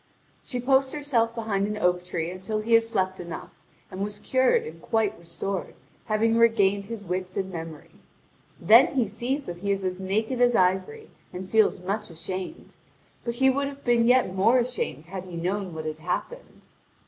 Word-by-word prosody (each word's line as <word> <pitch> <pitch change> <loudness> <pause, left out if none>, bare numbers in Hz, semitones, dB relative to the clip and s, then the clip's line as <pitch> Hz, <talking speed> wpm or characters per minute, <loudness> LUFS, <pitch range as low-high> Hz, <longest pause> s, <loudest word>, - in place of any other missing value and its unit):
She 250 -3 -3
posts 265 +2 +2
herself 240 -6 0
behind 205 -4 -1
an 210 0 -3
oak 180 -3 +1
tree 170 -2 -3
until 195 +4 -3
he 230 +2 0
had 230 - +8
slept 190 -5 -1
enough, 170 -1 -7 0.4
and 185 - -6
was 205 0 -3
cured 260 +2 +2
and 165 +1 -9
quite 220 -3 0
restored, 170 +3 -5 0.3
having 225 +1 +2
regained 205 -4 +3
his 225 -2 -7
wits 185 +1 -3
and 190 -1 -2
memory. 165 -3 -8 0.7
Then 230 +11 +6
he 250 -4 +3
sees 245 +7 -3
that 175 -1 -6
he 200 +2 -3
is 195 -1 -1
as 185 0 -2
naked 220 +6 -1
as 245 -1 +4
ivory, 190 - 0 0.2
and 185 +1 -7
feels 220 -1 +3
much 195 +4 -3
ashamed; 185 +3 -6 0.5
but 235 -1 -3
he 265 +2 +4
would 280 +1 -1
have 280 0 -9
been 235 -1 +3
yet 250 -6 +4
more 205 +7 +4
ashamed 240 - -2
had 185 +1 -7
he 180 -2 -9
known 185 +3 -2
what 155 0 -5
had 155 0 -4
happened. 180 - -5
205 Hz, 185 wpm, -26 LUFS, 185-235 Hz, 0.7 s, had